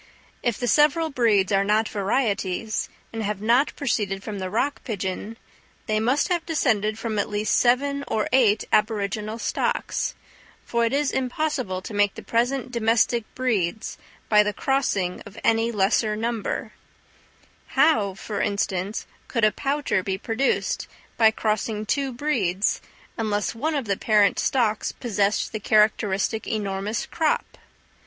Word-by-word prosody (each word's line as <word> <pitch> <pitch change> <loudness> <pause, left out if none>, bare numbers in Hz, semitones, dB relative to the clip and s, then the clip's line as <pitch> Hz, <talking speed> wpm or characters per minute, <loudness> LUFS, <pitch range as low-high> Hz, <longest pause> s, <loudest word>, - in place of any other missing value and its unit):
If 240 -4 0
the 245 - -2
several 305 +4 +3
breeds 215 -7 +2
are 195 0 +3
not 215 +2 +2
varieties, 205 -1 -1 0.2
and 225 - -3
have 210 -1 -2
not 235 +7 +2
proceeded 205 -7 -1
from 210 -3 -5
the 185 -1 -3
rock 265 +8 -1
pigeon, 205 0 -4 0.5
they 215 -2 +1
must 255 +6 +2
have 345 -2 +1
descended 220 -10 +1
from 225 -2 -2
at - - -1
least 210 +1 0
seven 280 +3 +2
or 215 - 0
eight 225 -5 +4
aboriginal 215 0 0
stocks; - - -1 0.5
for 235 0 +1
it 230 - 0
is 285 0 +1
impossible 255 -7 -2
to 215 - -7
make 205 -1 +2
the - - -9
present 245 +2 0
domestic 230 0 +2
breeds 220 -6 -1 0.3
by 210 -1 +6
the 210 0 0
crossing 200 -9 0
of 205 - -13
any 225 +1 +2
lesser 210 +1 +2
number: 225 0 -3 1.0
how, 215 -11 +4
for 205 +1 -4
instance, 200 0 -1 0.2
could 230 -3 -1
a 215 - +4
pouter 280 -7 0
be 190 0 -2
produced 230 +6 -1 0.3
by 220 -1 +6
crossing 215 0 -1
two 275 +4 0
breeds 225 -8 0 0.4
unless 210 -3 0
one 300 +7 -1
of 275 -4 -1
the 200 -2 0
parent 210 -2 +3
stocks 225 -5 +1
possessed 205 -3 0
the 215 - -3
characteristic 210 0 +2
enormous 205 0 -2
crop? 320 -2 -1
220 Hz, 145 wpm, -24 LUFS, 205-245 Hz, 1.0 s, by